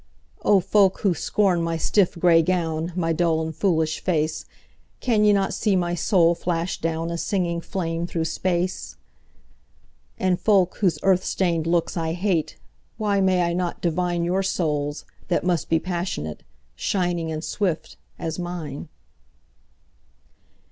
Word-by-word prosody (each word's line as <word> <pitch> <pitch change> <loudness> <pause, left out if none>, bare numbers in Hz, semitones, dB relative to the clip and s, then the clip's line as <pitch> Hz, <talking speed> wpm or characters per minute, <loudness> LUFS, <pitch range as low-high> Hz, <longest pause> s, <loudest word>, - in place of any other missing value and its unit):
O 200 - +5
folk 195 +1 +3
who 195 -4 +3
scorn 180 +2 +1
my 165 0 -1
stiff 190 +4 +2
gray 170 -1 +5
gown, 165 -1 -1
My 165 -2 0
dull 165 -1 +1
and 160 -1 -4
foolish 160 -5 +1
face, 155 -3 -1 0.5
Can 225 -4 +2
ye 210 - +6
not 195 -1 +1
see 210 -3 +1
my 175 -1 0
soul 170 -1 +3
flash 170 0 -2
down,A 165 +1 -2
singing 170 -4 -1
flame 170 -2 -3
through 165 -2 -2
space? 180 +2 -2 1.2
And 185 -1 +1
folk, 195 -4 +3
whose 185 -5 +2
earth 190 -1 +3
stained 170 -4 0
looks 170 +1 0
I 165 -1 -1
hate, 180 -3 -1 0.4
Why 205 -2 +1
may 185 -2 +3
I 170 0 0
not 175 -1 -2
divineYour 175 +2 0
souls, 150 -5 -1 0.2
that 175 - 0
must 175 -3 0
be 165 - +4
passionate, 170 - -4 0.3
Shining 175 - -1
and 155 0 -4
swift, 180 -5 -2 0.2
as 160 +1 -4
mine? 175 -5 -5
175 Hz, 140 wpm, -24 LUFS, 165-185 Hz, 1.2 s, ye